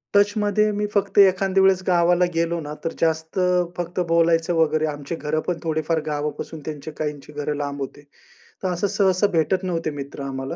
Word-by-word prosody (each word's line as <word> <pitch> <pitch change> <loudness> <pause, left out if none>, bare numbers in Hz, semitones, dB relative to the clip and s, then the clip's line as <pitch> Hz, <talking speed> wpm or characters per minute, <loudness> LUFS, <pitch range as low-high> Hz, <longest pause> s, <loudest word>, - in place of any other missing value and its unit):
टचमध्ये 205 +1 +3
मी 210 0 -1
फक्त 200 - 0
एखाद्या 195 0 +5
वेळेस 190 -1 +4
गावाला 175 0 +4
गेलो 170 +1 0
ना, 150 -1 -6
तर 165 - 0
जास्त 160 +2 0
अ, 180 -1 +3
फक्त 175 +1 -3
बोलायचं 165 0 +3
वगैरे. 155 -1 +2
आमची 145 +3 -5
घरं 155 0 -2
पण 180 - 0
थोडेफार 160 0 0
गावापासून 150 +1 -4
त्यांचे 155 0 -6
काहींची 150 -1 -4
घरं 145 0 -2
लांब 145 -1 -4
होते. 140 +2 -6 0.6
तर 185 - +1
असं 180 +3 0
सहसा 190 0 +2
भेटत 170 +3 +1
नव्हते 170 -3 -1
मित्र 140 -1 -7
आम्हाला. 135 +3 -4
165 Hz, 175 wpm, -23 LUFS, 150-185 Hz, 0.6 s, एखाद्या